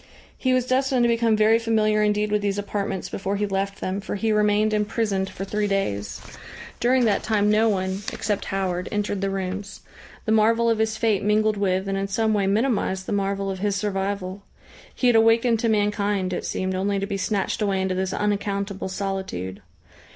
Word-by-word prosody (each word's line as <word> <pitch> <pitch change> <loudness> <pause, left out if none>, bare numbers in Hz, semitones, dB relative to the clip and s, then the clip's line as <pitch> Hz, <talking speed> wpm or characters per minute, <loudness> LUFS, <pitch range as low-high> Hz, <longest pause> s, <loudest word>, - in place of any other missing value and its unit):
He 260 - 0
was 255 -1 +2
destined 260 -1 +2
to - - +4
become 230 -1 +2
very 220 +1 +4
familiar 215 -2 +2
indeed 210 0 +1
with 210 0 +2
these 200 0 -1
apartments 200 -2 -3
before 195 +1 -3
he 205 +1 0
left 195 0 -2
them, 190 +2 -2
for 210 - -4
he 220 +2 0
remained 210 0 +2
imprisoned 210 -2 0
for 195 - -6
three 210 +1 -1
days. 105 - -2 0.6
During 250 +1 +3
that 205 -3 +2
time 210 -1 +2
no 220 +1 +4
one, 190 -1 -1
except 205 -1 -2
Howard, 185 -2 -2
entered 205 -1 -1
the 195 - 0
rooms. 195 +1 -4 0.4
The 220 - 0
marvel 225 +2 +4
of 225 - 0
his 220 0 0
fate 220 -3 +1
mingled 215 +1 +2
with 190 -1 0
and 195 0 -1
in 195 - -2
some 220 +2 +1
way 200 -2 +1
minimised 200 -3 0
the - - -5
marvel 195 -1 -1
of 190 - -5
his 205 0 0
survival. 195 -1 -2 0.5
He - - -2
had 245 -1 +5
awakened 225 +1 +4
to 230 - +1
mankind 205 -3 0
it - - -3
seemed 185 0 -2
only 195 +2 0
to 195 - -1
be 200 0 -3
snatched 200 +3 -1
away 200 -2 +1
into 190 0 0
this 185 0 -1
unaccountable 200 -1 -2
solitude. 190 - -4
205 Hz, 195 wpm, -24 LUFS, 195-215 Hz, 0.6 s, had